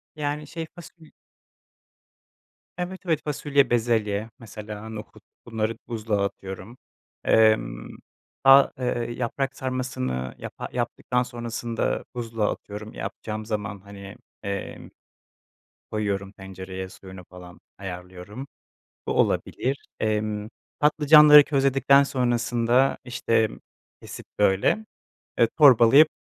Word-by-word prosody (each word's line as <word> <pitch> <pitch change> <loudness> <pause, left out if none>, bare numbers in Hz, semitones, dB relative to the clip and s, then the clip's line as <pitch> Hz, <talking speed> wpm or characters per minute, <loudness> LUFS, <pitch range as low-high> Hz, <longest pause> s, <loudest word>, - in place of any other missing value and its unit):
Yani 150 0 -3
şey 165 +2 -6
fasul 170 -2 -14 1.7
Evet, 180 +1 -4
evet. 160 -4 +1
Fasulye, 145 -1 +1
bezelye, 110 -3 0
mesela 105 -1 -8
nohut 110 0 -10 0.2
bunları 115 -1 -2
buzluğa 110 -3 -1
atıyorum. 95 +4 -7 0.5
Emm, - - +2 0.5
fa 135 +1 +7
eee 120 -2 -2
yaprak 135 +2 -2
sarmasını 65 - -3
yapa - - -7
yaptıktan 125 +1 -1
sonrasında 120 -1 -3
buzluğa 115 -3 -1
atıyorum 105 +1 -8
yapacağım 110 +2 -6
zaman 105 -2 -4
hani, 100 0 -11 0.3
emm, 100 0 -5 1.0
koyuyorum 100 -2 -2
tencereye, 95 -1 -8
suyunu 95 -1 -12
falan 90 -1 -13 0.2
ayarlıyorum, 95 +5 -8 0.6
bu - - 0
olabilir. 135 +2 0
Emm, 105 -1 -1 0.3
patlıcanları 150 0 +8
közledikten 140 0 +4
sonrasında 120 -1 +1
işte 115 -2 +1 0.5
kesip - - -10
böyle, 100 - +2 0.5
eee, 115 - +5
torbalayıp 140 +1 +7
115 Hz, 95 wpm, -25 LUFS, 100-135 Hz, 1.7 s, patlıcanları